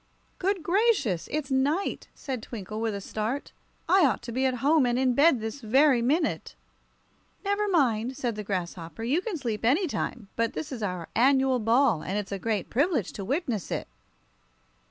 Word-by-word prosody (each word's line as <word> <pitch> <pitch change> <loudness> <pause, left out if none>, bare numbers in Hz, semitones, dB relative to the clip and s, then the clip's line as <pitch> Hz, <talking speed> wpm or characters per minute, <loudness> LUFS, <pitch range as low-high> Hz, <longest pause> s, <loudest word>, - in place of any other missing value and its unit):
"Good 380 -2 0
gracious! 345 - +1
It's 290 -2 -2
night," 285 +8 0
said 260 -5 -5
Twinkle, 215 -1 -6
with 225 -2 -1
a 200 - -5
start. 220 +8 -3 0.4
"I 370 +2 +5
ought 265 -4 +2
to 240 - -6
be 260 +3 +1
at 255 - 0
home 295 -3 +4
and 240 0 +1
in 255 -1 +2
bed 280 0 +5
this 220 +5 -5
very 260 +3 +4
minute!" 300 +7 0 0.9
"Never 405 +1 +1
mind," 255 - +1
said 240 -2 -1
the 210 - -5
grasshopper; 180 0 -4
"you 280 +9 +1
can 400 -4 -3
sleep 230 -7 -3
any 285 - +3
time, 245 - -4
but 230 0 0
this 155 +1 -5
is 250 -4 -5
our 180 -5 -3
annual 265 +1 +4
ball, 230 - +3
and 195 - -3
it's 205 -2 -4
a 200 - -3
great 215 -2 -1
privilege 275 - +1
to 200 - -6
witness 250 - -2
it." - - -3
250 Hz, 180 wpm, -27 LUFS, 215-290 Hz, 0.9 s, I